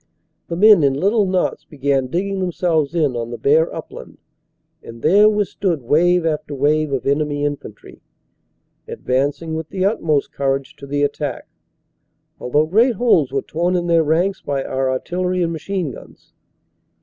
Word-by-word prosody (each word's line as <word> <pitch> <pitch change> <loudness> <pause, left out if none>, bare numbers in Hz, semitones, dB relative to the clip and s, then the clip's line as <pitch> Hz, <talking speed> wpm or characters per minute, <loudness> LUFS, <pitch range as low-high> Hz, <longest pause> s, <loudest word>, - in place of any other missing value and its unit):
The 170 - -4
men 210 0 +6
in 140 -2 +2
little 200 +7 +1
knots 185 -1 -1
began 140 -3 -1
digging 195 +7 -2
themselves 170 -4 0
in 150 -7 +1
on 115 -1 -4
the 120 - -6
bare 155 +6 +2
upland, - - -9 0.6
and 115 0 -12
there 205 +7 +6
withstood 195 -7 -1
wave 175 +6 +2
after 150 -2 -2
wave 150 +2 +1
of 135 -2 -2
enemy 145 +1 0
infantry, 145 -7 -7 0.9
advancing 145 +5 -2
with 160 0 -5
the 190 -1 -1
utmost 160 -8 0
courage 135 -1 -2
to 140 - -11
the 145 +1 -1
attack, 145 0 -3 0.9
although 145 +5 +1
great 225 +9 +3
holes 180 - +2
were 135 -1 -1
torn 175 +3 -1
in 175 -1 0
their 170 -1 +3
ranks 170 +6 0
by 140 -1 -2
our 130 0 -1
artillery 180 +7 -1
and 170 0 -1
machine 170 -1 -3
guns. - - -15
155 Hz, 155 wpm, -19 LUFS, 140-180 Hz, 0.9 s, men